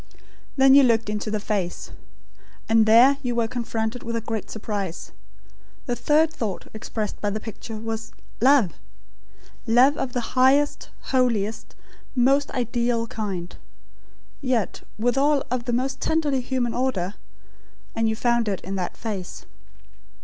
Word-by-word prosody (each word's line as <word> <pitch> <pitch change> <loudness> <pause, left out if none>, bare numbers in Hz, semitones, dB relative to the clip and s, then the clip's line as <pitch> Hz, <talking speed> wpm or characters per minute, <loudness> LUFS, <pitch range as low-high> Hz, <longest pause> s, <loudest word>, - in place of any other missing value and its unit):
Then 270 0 +6
you 280 - +9
looked 230 -4 +2
into 210 +1 -3
the 215 0 -1
face. 195 -4 -3 0.8
And 225 -1 +4
there 245 +5 +7
you 245 -3 -2
were 230 -1 +1
confronted 230 0 -3
with 230 0 -4
a - - +1
great 225 -2 -4
surprise. 200 -5 -5 0.7
The 245 - -1
third 305 +7 +2
thought 210 - -4
expressed 215 -1 -5
by 205 - 0
the 210 +2 -3
picture 220 +1 -8
was 225 0 -5 0.3
Love 255 - +4 0.9
love, 255 +6 +5
of 250 -2 -3
the 245 -2 -3
highest, 270 +3 +3 0.2
holiest, 230 -4 0 0.4
most 270 +3 +3
ideal, 240 -1 0
kind; 195 -6 -5 0.9
yet, 250 -7 -1 0.2
withal, 270 +6 +2
of 250 -2 -1
the 245 - -1
most 260 +2 -1
tenderly 295 -5 +1
human 245 -2 -1
order; 210 -8 -1 0.8
and 225 0 +1
you 220 - 0
found 235 0 +1
it 195 -3 -1
in 190 - -6
that 180 -2 -4
face. 200 -6 -6
235 Hz, 140 wpm, -24 LUFS, 215-260 Hz, 0.9 s, you